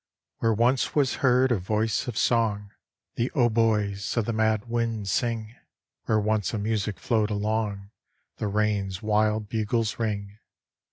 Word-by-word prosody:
Where 115 - +2
once 125 +4 +2
was 140 -4 +2
heard 130 0 +4
a 115 - +2
voice 105 +5 -1
of 120 -4 -4
song, 105 -4 +1 0.5
The 120 +2 0
hautboys 110 -4 +1
of 115 - +2
the 115 - -1
mad 110 0 +1
winds 115 -4 -1
sing; 115 -4 -1 0.5
Where 110 -1 +2
once 105 0 0
a - - -1
music 105 -2 -1
flowed 110 +3 +1
along, 105 -1 -2 0.5
The 105 - -2
rain's 100 -2 -1
wild 110 0 +1
bugles 110 +1 -1
ring. 105 -2 -3
110 Hz, 145 wpm, -26 LUFS, 105-115 Hz, 0.5 s, heard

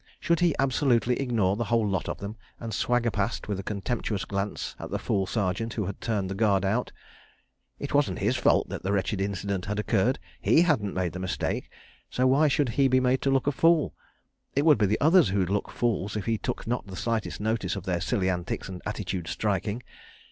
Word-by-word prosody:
Should 170 -1 +1
he 175 -4 +3
absolutely 125 -3 +2
ignore 115 -8 +1
the 120 +2 -2
whole 115 -1 +2
lot 95 -1 -1
of - - -3
them, 100 +2 -6 0.2
and 115 -2 -5
swagger 120 +2 +1
past 100 +2 -2
with 100 -2 -2
a - - -5
contemptuous 105 0 -2
glance 100 +1 -3
at - - -6
the - - -1
fool 95 -1 -1
Sergeant 100 +2 -1
who 105 - -1
had 100 - -6
turned 105 -5 -1
the 95 - -3
Guard 100 -1 +2
out?... 110 +6 0 0.9
It 140 - -5
wasn't 145 0 +2
his 105 +6 +1
fault 120 - +3
that - - -5
the 95 - -2
wretched 95 0 0
incident 100 -1 -2
had 105 0 -2
occurred.... 110 +3 +1 0.2
He 165 - +5
hadn't 120 - +1
made 90 -2 -1
the 90 - -5
mistake, 95 0 -2 0.4
so 130 - 0
why 140 +4 +5
should 145 -2 +2
he 135 +4 +3
be 130 0 +4
made 130 0 +2
to 140 - +1
look 135 -1 +2
a 145 - +3
fool? 165 +2 +3 0.6
It 140 +2 +2
would 150 -3 +6
be 105 - +4
the 105 - +1
others 160 - +5
who'd 95 -2 0
look 100 - +1
the - - -12
fools, 110 -4 -1
if 100 - -4
he 115 -2 0
took - - -4
not 120 -2 -2
the 95 - -8
slightest 115 +2 -2
notice 110 +1 -1
of 100 - -5
their 90 -2 -1
silly 100 -3 0
antics 90 -2 -2
and 95 -2 -7
attitude 95 -5 -3
striking. 105 +5 -1
110 Hz, 220 wpm, -27 LUFS, 95-125 Hz, 0.9 s, would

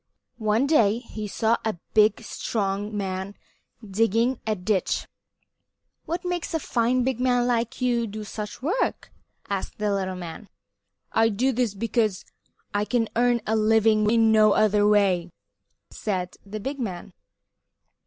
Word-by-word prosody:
One 215 +4 +2
day 230 -8 +4
he 220 -3 -7
saw 225 +3 +1
a 220 -5 -2 0.2
big, 215 0 +4
strong 205 -1 -2
man 190 0 -3 0.5
digging 225 +5 +1
a 215 - +1
ditch 190 0 -1 1.0
"What 350 +2 -3
makes 355 -2 -2
a - - +1
fine 245 -2 +1
big 260 -1 -1
man 250 -1 +2
like 235 0 -1
you 240 -2 +1
do 215 +1 -6
such 210 +3 -7
work?" 385 - -1 0.4
asked 200 -2 -4
the 210 -1 0
little 190 -1 -2
man. 180 +3 -8 0.6
"I 225 0 +3
do 240 +6 +1
this 240 -4 -1
work 195 - -13
because 225 -4 0 0.5
I 205 0 +1
can 225 0 0
earn 240 0 +3
a 220 - +1
living 215 -1 +3
in 225 0 +4
no 215 -1 +5
other 210 -1 +3
way," 195 -4 +3 0.6
said 185 -4 -3
the 205 +2 -7
big 275 +6 -4
man. 185 -8 -5
220 Hz, 145 wpm, -25 LUFS, 205-240 Hz, 1.0 s, no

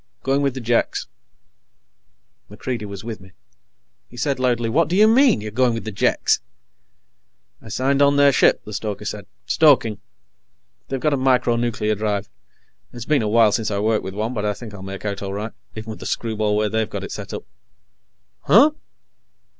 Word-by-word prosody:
Going 135 +1 +1
with 140 -2 0
the 130 - -5
Jeks." 120 0 0 1.4
MacReidie 105 +1 -5
was 100 -1 -8
with 115 -3 -6
me. 95 0 -16 0.8
He 120 - -14
said 140 0 -1
loudly: 120 -2 +1
"What 145 +7 +2
do 175 - -1
you 210 +2 +6
mean, 245 - +4
you're 105 0 -6
going 120 +1 +2
with 115 - -5
the 110 - -5
Jeks?" 100 - +1 1.2
"I - - -12
signed 135 +5 +1
on 140 0 +5
their 145 0 +5
ship," - - +3
the 105 - -8
stoker 105 0 -4
said. 105 -2 -5 0.2
"Stoking. 130 -9 +3 0.9
They've 135 - -3
got 150 +2 +1
a - - +1
micro 125 -2 +2
nuclear 115 -2 -1
drive. 105 -1 -2 0.6
It's 120 -2 -8
been 150 -4 +2
a 110 - -1
while 110 -1 +5
since 110 +1 -1
I 100 - -2
worked 110 +1 +1
with 95 0 -6
one, 110 +4 -2
but 105 -4 -3
I 105 -1 -1
think 110 -2 -10
I'll 100 - -9
make 95 +1 -8
out 100 -1 -3
all 100 -1 -4
right, 105 +2 -4 0.2
even 110 0 -6
with 110 - -9
the - - -6
screwball 110 -2 -1
way 105 0 +1
they've 110 0 -1
got - - -5
it - - -7
set - - -7
up." - - -6 1.0
"Huh?" 300 +2 +5
115 Hz, 195 wpm, -21 LUFS, 105-130 Hz, 1.4 s, you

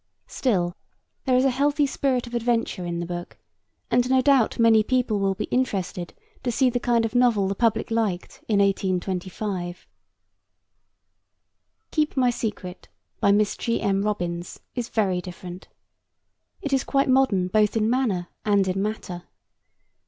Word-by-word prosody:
Still, 180 -9 0 0.5
there 260 -2 +3
is 255 +1 +4
a 270 - +4
healthy 285 +3 +2
spirit 265 -2 0
of 240 - -11
adventure 230 -6 -1
in 170 0 -3
the 170 - -3
book, 175 0 -6 0.5
and 245 +1 +3
no 260 0 +4
doubt 265 -3 +3
many 230 -1 +5
people 240 -2 0
will 195 -1 +1
be - - -3
interested 190 -8 -2 0.3
to 245 - -1
see 255 +1 +2
the 245 - 0
kind 235 -1 +2
of 225 - -4
novel 240 -6 +3
the 195 - 0
public 230 +2 0
liked 215 -6 -2
in 215 - +2
1825. 185 -1 -1 2.1
Keep 305 -3 0
My 250 -2 +4
Secret, 200 -6 -5 0.3
by 200 - +4
Miss 205 0 +2
G. 230 -1 -1
M. 195 0 +1
Robins, 175 -4 -3
is 245 -2 -4
very 190 -5 0
different. 180 0 -9 1.0
It 285 - -2
is 270 - +2
quite 275 0 +1
modern 255 -9 +3
both 210 +3 +2
in 215 -1 +2
manner 225 -8 0
and 200 -2 +2
in 185 +1 0
matter. 190 -4 -4
215 Hz, 150 wpm, -24 LUFS, 185-245 Hz, 2.1 s, many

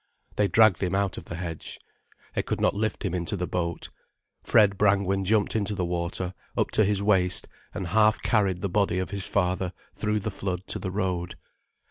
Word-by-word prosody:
They 105 - +2
dragged 110 -3 +5
him 95 0 0
out 100 -1 0
of - - -14
the 85 - -6
hedge. 85 -2 -6 0.5
They - - 0
could - - -3
not - - +2
lift 110 +1 -2
him 95 - -1
into 90 +3 -2
the 90 - -1
boat. 85 -2 -3 0.5
Fred 105 -3 +4
Brangwen 95 -1 +2
jumped 105 +2 +2
into 105 -1 0
the 90 -3 -1
water, 85 +1 -3 0.2
up - - +1
to 110 - +4
his 100 0 +1
waist, 90 -4 +3 0.2
and 95 - -4
half 110 +4 +3
carried 95 -5 +1
the 100 - 0
body 100 -1 +1
of 95 +1 -2
his 100 -1 -3
father 90 -1 0 0.2
through 105 0 -1
the 110 +2 -3
flood 95 -1 -4
to - - -2
the 95 - -3
road. 90 -3 -2
95 Hz, 195 wpm, -26 LUFS, 90-105 Hz, 0.5 s, dragged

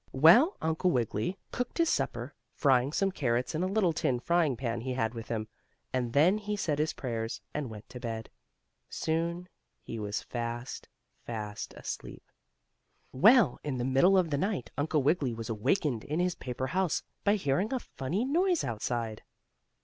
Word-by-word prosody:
Well, 175 - +7
Uncle 160 +3 +1
Wiggily 120 - 0
cooked 245 0 -3
his 335 -1 +3
supper, - - -2 0.2
frying 135 -1 +3
some 195 +4 +1
carrots 125 -7 0
in 160 - -1
a 185 - +1
little 190 -3 +2
tin 135 -6 0
frying 160 -2 +2
pan 115 -2 -2
he 130 +1 -3
had 115 -2 0
with 115 -1 -7
him, 110 -2 -2 0.5
and 125 -2 0
then 175 +9 +5
he 210 0 -3
said 150 -7 -1
his 155 +1 +1
prayers, 115 -3 -3
and 145 -4 -3
went 105 -1 -10
to 125 - -8
bed. 115 -2 -4 0.6
Soon 170 +2 -1 0.3
he 115 - -7
was 105 -1 -3
fast, 120 +1 -5 0.3
fast 105 -3 -5
asleep. - - -7 0.9
Well, 205 - +5
in 145 -4 -2
the 120 - -1
middle 135 +9 +5
of 175 -4 +2
the 145 - +1
night, 190 - -2
Uncle 150 0 +1
Wiggily 140 -5 +2
was 115 0 -5
awakened 125 - 0
in 150 +3 -2
his 180 0 +2
paper 130 -2 -4
house 185 +5 0 0.2
by 205 +1 +4
hearing 185 - 0
a 265 - +1
funny 180 - -3
noise 350 +5 +2
outside. 115 -1 -3
140 Hz, 170 wpm, -30 LUFS, 120-180 Hz, 0.9 s, Well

